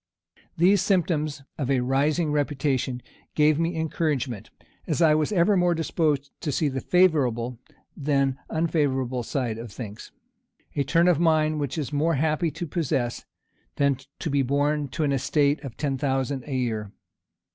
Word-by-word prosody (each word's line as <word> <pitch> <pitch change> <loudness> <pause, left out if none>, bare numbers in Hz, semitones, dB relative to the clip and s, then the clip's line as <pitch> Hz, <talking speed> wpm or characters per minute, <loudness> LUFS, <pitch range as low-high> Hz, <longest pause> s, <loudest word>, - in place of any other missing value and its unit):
These 185 +3 +4
symptoms 155 -6 0 0.2
of 135 -3 -1
a 135 -2 +2
rising 145 +5 +1
reputation 135 -4 -1 0.3
gave 150 0 +4
me 165 +1 0
encouragement, 145 - -2 0.4
as 160 -3 -1
I 160 -3 +5
was 155 +5 +1
ever 200 +1 +3
more 175 -2 +3
disposed 155 -4 0
to 150 - -2
see 145 +2 +1
the 135 -1 -3
favorable 125 -10 +2 0.4
than 140 -2 0
unfavorable 140 -6 0
side 120 -2 -2
of 115 -2 -8
things; 105 -2 -8 0.6
a 140 - +1
turn 165 +6 +3
of 175 -4 +4
mind 155 -2 +2
which 145 +1 -3
it - - 0
is 145 +1 -6
more 155 +3 +2
happy 155 +3 +1
to 160 +4 -5
possess, 135 -7 -2 0.5
than 140 -2 +2 0.2
to 160 - -3
be 140 0 +2
born 145 +2 +1
to 140 +4 -3
an 145 - +1
estate 140 +2 +1
of 135 -5 -8
ten 140 -3 -2
thousand 135 -1 -1
a 140 - -3
year. 110 -5 -2
145 Hz, 160 wpm, -25 LUFS, 130-160 Hz, 0.6 s, I